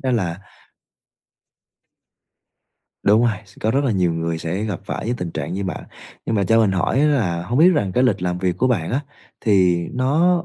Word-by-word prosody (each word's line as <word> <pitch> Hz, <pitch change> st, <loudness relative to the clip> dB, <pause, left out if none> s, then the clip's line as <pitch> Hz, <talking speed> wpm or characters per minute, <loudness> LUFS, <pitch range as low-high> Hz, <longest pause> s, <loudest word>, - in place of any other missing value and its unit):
đó 130 Hz, -, 0 dB
là 95 Hz, -6 st, -1 dB, 2.6 s
Đúng 105 Hz, +3 st, +4 dB
rồi, 110 Hz, -4 st, 0 dB
s 95 Hz, -, -20 dB
có 110 Hz, -, +1 dB
rất 140 Hz, +3 st, +1 dB
là 130 Hz, -, +1 dB
nhiều 90 Hz, -4 st, +1 dB
người 80 Hz, 0 st, -2 dB
sẽ 85 Hz, +5 st, -3 dB
gặp 100 Hz, -6 st, -4 dB
phải -, -, -5 dB
cái 120 Hz, +2 st, -1 dB
tình 90 Hz, -5 st, -4 dB
trạng 80 Hz, +1 st, -4 dB
như 100 Hz, +1 st, -3 dB
bạn, 90 Hz, -, -5 dB, 0.4 s
nhưng 115 Hz, -, -1 dB
mà 100 Hz, -, +1 dB
cho 115 Hz, +5 st, +3 dB
mình 105 Hz, -3 st, +2 dB
hỏi 95 Hz, +8 st, +1 dB
á 150 Hz, -, +4 dB
là 95 Hz, -, 0 dB
hông 120 Hz, +9 st, -2 dB
biết 170 Hz, +3 st, +7 dB
rằng 100 Hz, -, 0 dB
cái 125 Hz, +1 st, +2 dB
lịch 125 Hz, -, +1 dB
làm 90 Hz, 0 st, -1 dB
việc 90 Hz, -1 st, -1 dB
của 130 Hz, -, +2 dB
bạn 90 Hz, -10 st, 0 dB
á, 130 Hz, -, 0 dB, 0.4 s
thì 95 Hz, -5 st, +3 dB, 0.2 s
nó 160 Hz, +8 st, +2 dB
100 Hz, 215 wpm, -21 LUFS, 90-125 Hz, 2.6 s, biết